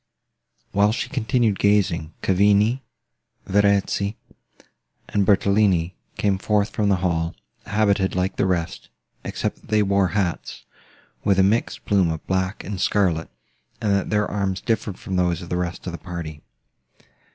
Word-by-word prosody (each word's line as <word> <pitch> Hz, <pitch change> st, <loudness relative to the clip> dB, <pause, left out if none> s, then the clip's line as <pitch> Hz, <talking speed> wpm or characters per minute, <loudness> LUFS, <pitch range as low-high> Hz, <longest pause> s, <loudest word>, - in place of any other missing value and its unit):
While 100 Hz, +1 st, +3 dB
she -, -, -3 dB
continued 120 Hz, -5 st, +1 dB
gazing, 90 Hz, -6 st, +1 dB
Cavigni, 105 Hz, +6 st, +3 dB, 0.6 s
Verezzi, 100 Hz, +1 st, +1 dB, 0.9 s
and 100 Hz, -2 st, 0 dB
Bertolini 100 Hz, -3 st, +3 dB, 0.2 s
came 100 Hz, -2 st, +1 dB
forth 105 Hz, 0 st, +1 dB
from 105 Hz, -1 st, 0 dB
the 100 Hz, -, +4 dB
hall, 85 Hz, -1 st, 0 dB, 0.3 s
habited 100 Hz, -3 st, +1 dB
like 95 Hz, +1 st, 0 dB
the -, -, +1 dB
rest, 85 Hz, -3 st, -2 dB, 0.3 s
except -, -, -3 dB
that -, -, -19 dB
they 105 Hz, -1 st, +3 dB
wore 100 Hz, -1 st, +2 dB
hats, 90 Hz, -5 st, -2 dB, 0.6 s
with 100 Hz, -2 st, +3 dB
a 95 Hz, -, +5 dB
mixed 105 Hz, +5 st, 0 dB
plume 95 Hz, -5 st, +3 dB
of 80 Hz, -1 st, -4 dB
black 95 Hz, +1 st, -1 dB
and 95 Hz, -2 st, -5 dB
scarlet, 90 Hz, -6 st, +1 dB, 0.5 s
and 105 Hz, -4 st, +1 dB
that 100 Hz, -1 st, 0 dB
their 105 Hz, -1 st, +2 dB
arms 95 Hz, -2 st, -2 dB
differed 110 Hz, -4 st, -2 dB
from 95 Hz, -, -4 dB
those 90 Hz, -1 st, +1 dB
of 85 Hz, -, -10 dB
the -, -, -1 dB
rest 90 Hz, -1 st, -4 dB
of 90 Hz, -, -3 dB
the 85 Hz, -, -7 dB
party. 80 Hz, -3 st, -7 dB
100 Hz, 150 wpm, -23 LUFS, 90-105 Hz, 0.9 s, a